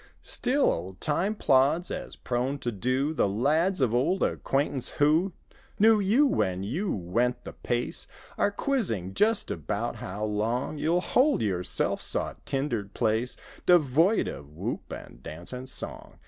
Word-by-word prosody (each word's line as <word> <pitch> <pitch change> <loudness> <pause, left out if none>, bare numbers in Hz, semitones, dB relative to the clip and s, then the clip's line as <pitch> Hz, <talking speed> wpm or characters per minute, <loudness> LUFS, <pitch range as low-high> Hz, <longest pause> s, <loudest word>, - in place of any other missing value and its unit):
Still 270 +3 +2
old 90 +3 -5
time 185 +8 0
plods, 145 +2 +3
as - - -5
prone 125 +3 -2
to 120 -3 -3
do; 130 +8 0
The 105 - +1
lads 155 - +1
of 120 -3 +2
old 135 +10 +1
acquaintance 135 -2 -1
who 155 +6 +3 0.5
Knew 220 +1 +5
you 215 +9 +4
when 95 - 0
you 165 - -2
went 115 +7 -1
the - - -8
pace 120 0 -3 0.3
Are - - +2
quizzing 195 - -1
just 215 - +2
about 115 +3 -3
how 105 +1 -4
long 115 +8 -1
You'll 170 +4 +1
hold 260 - +2
your 95 -4 -1
self - - 0
sought - - +2
tindered 120 -8 -2
place, 115 +2 0 0.3
Devoid 170 - +4
of 70 -1 -7
whoop 75 - -5
and - - -9
dance 85 - -9
and 125 +1 -6
song. - - -7
130 Hz, 150 wpm, -27 LUFS, 110-175 Hz, 0.5 s, Knew